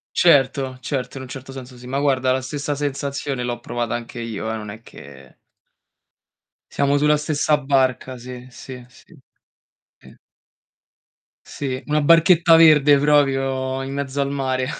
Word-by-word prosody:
Certo, 135 -5 +3
certo, 130 +1 -4
in - - -8
un 130 - -10
certo 135 +1 -9
senso 130 -1 -10
sì. 125 - -13
Ma 135 +2 -2
guarda, 130 -2 +1
la 130 - 0
stessa 145 +2 -4
sensazione 140 -2 -3
l'ho 120 -1 -4
provata 120 -1 -4
anche 120 0 -7
io, 110 -1 -4
eh, - - -3
non 105 -1 -7
è 110 +2 -11
che 70 - -15 1.4
Siamo 140 0 +1
sulla 150 +1 +3
stessa 150 0 0
barca, 130 -2 0
sì, 125 +1 -10
sì, 125 0 -11
sì. 125 - -22 0.9
I - - -18 1.3
Sì, 130 -2 -5
una 150 0 0
barchetta 165 +1 +5
verde, 150 -3 +6
proprio, 135 -2 +1
in 135 +1 -6
mezzo 140 0 -3
al 140 0 -1
mare. 130 -2 -2
135 Hz, 150 wpm, -21 LUFS, 125-145 Hz, 1.4 s, verde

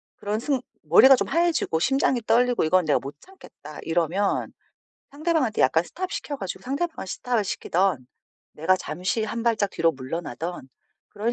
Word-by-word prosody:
그런 210 +2 -3
승 265 0 -1 0.2
머리가 265 0 +7
좀 - - -2
하얘지고 335 - +1
심장이 265 - +1
떨리고 245 -1 +3
이건 180 +2 +3
내가 150 - +2
못 140 +1 -8
참겠다.' 155 - -13
이러면 175 +4 0 0.6
상대방한테 300 -6 0
약간 160 +5 +3
stop 370 - -6
시켜 300 -8 -4
가지고 195 -7 -6
상대방을 300 - -3
stop 235 +3 -1
시키든 185 -7 0 0.5
내가 175 +5 +2
잠시 185 +6 -2
한 230 +1 -4
발짝 220 -4 +1
뒤로 165 0 +1
물러나든 145 +3 -5 0.6
그런 220 +3 -2
210 Hz, 370 characters per minute, -24 LUFS, 165-265 Hz, 0.6 s, 머리가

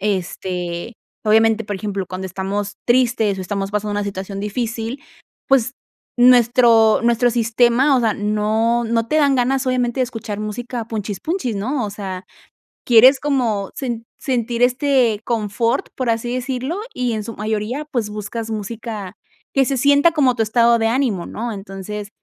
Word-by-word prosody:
este, 185 0 -3 0.3
obviamente, 225 +1 +3
por 205 -1 -4
ejemplo, 195 -1 -4
cuando 185 +1 -5
estamos 195 +2 -4
tristes 240 -5 +2
o - - -3
estamos 195 +1 -3
pasando 210 0 -2
una 205 0 -1
situación 195 0 -5
difícil, 230 +4 -3 0.4
pues, 270 -1 +2 0.4
nuestro 240 -2 +5
nuestro 235 +1 +3
sistema, 240 +4 +3
o - - +2
sea, 225 -3 +1
no 215 +3 0
no 230 0 0
te 305 - 0
dan 285 -3 +4
ganas, 260 +2 +1
obviamente, 255 0 0
de - - +4
escuchar 225 -4 -6
música 235 +2 -5
punchis 210 -4 -4
punchis, 315 - -2
¿no?, 245 +5 -2
o 205 - -4
sea, 190 -2 -6 0.6
quieres 255 +3 +7
como 245 -8 -1
sen 235 -4 -4
sentir 240 -2 -2
este 250 -3 +2
confort, 230 +1 -1
por 255 -3 -2
así 230 +1 -2
decirlo, 260 +7 -3
y 250 -2 -1
en 215 -1 -3
su 230 - -7
mayoría, 220 +7 -3
pues, 225 -5 -1
buscas 215 +2 -5
música 215 -2 -5 0.4
que 270 -1 +3
se 270 +1 -1
sienta 285 +5 +4
como 270 -6 +2
tu 225 - +1
estado 235 +2 +3
de 225 - +2
ánimo, 230 -7 0
¿no? 235 +2 -5
Entonces, 200 0 -7
230 Hz, 160 wpm, -20 LUFS, 210-250 Hz, 0.6 s, quieres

